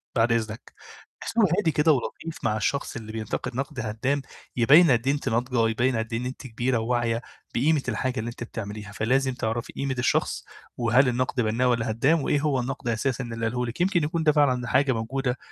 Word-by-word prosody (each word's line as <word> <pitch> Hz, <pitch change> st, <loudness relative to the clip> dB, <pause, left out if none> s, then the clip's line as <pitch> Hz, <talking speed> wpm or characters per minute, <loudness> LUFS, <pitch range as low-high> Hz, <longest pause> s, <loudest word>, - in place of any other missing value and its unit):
بعد 115 Hz, 0 st, +3 dB
إذنك، 110 Hz, -1 st, -2 dB, 0.5 s
باحس -, -, -6 dB
إن 230 Hz, -, +6 dB
هو -, -, +6 dB
هادي 170 Hz, -6 st, +2 dB
كده 150 Hz, +2 st, +3 dB
ولطيف 155 Hz, +4 st, -2 dB
مع 110 Hz, -2 st, +1 dB
الشخص 140 Hz, +7 st, -1 dB
اللي 110 Hz, -2 st, -7 dB
بينتقد 110 Hz, +3 st, -4 dB
نقد 135 Hz, +1 st, -4 dB
هدام، 115 Hz, +6 st, -1 dB, 0.3 s
يبين 145 Hz, +7 st, +6 dB
قد 120 Hz, +1 st, +1 dB
إيه 140 Hz, -, +4 dB
أنتِ 145 Hz, -2 st, -2 dB
ناضجة، 120 Hz, 0 st, +1 dB
يبين 120 Hz, +3 st, +1 dB
قد 110 Hz, 0 st, -3 dB
إيه 115 Hz, -, 0 dB
إن 125 Hz, -, -4 dB
أنتِ 130 Hz, +1 st, -6 dB
كبيرة 120 Hz, +2 st, 0 dB
وواعية 115 Hz, 0 st, 0 dB, 0.3 s
بقيمة 150 Hz, +4 st, +3 dB
الحاجة 125 Hz, +1 st, -1 dB
اللي 115 Hz, +2 st, -3 dB
أنتِ 120 Hz, -, -7 dB
بتعمليها، 105 Hz, -2 st, -7 dB
فلازم 130 Hz, +6 st, +1 dB
تعرفي 115 Hz, -1 st, -3 dB
قيمة 135 Hz, -1 st, -2 dB
الشخص، 120 Hz, -, 0 dB, 0.3 s
وهل 120 Hz, +3 st, +4 dB
النقد 125 Hz, 0 st, 0 dB
بنّاء 115 Hz, +3 st, +1 dB
والّا 120 Hz, -2 st, +1 dB
هدام، 140 Hz, +9 st, +2 dB
وإيه 145 Hz, -, +1 dB
هو 145 Hz, -3 st, +1 dB
النقد 125 Hz, 0 st, -4 dB
أساسًا 120 Hz, +3 st, -1 dB
اللي 115 Hz, -1 st, -4 dB
قاله 125 Hz, +2 st, -1 dB
لِك، 120 Hz, +7 st, -5 dB
يمكن 180 Hz, -2 st, +2 dB
يكون 160 Hz, +2 st, -1 dB
ده 155 Hz, -, +5 dB
فعلًا 130 Hz, -5 st, +2 dB
حاجة 135 Hz, +2 st, +3 dB
موجودة، 125 Hz, +3 st, -2 dB
125 Hz, 205 wpm, -25 LUFS, 115-135 Hz, 0.5 s, إن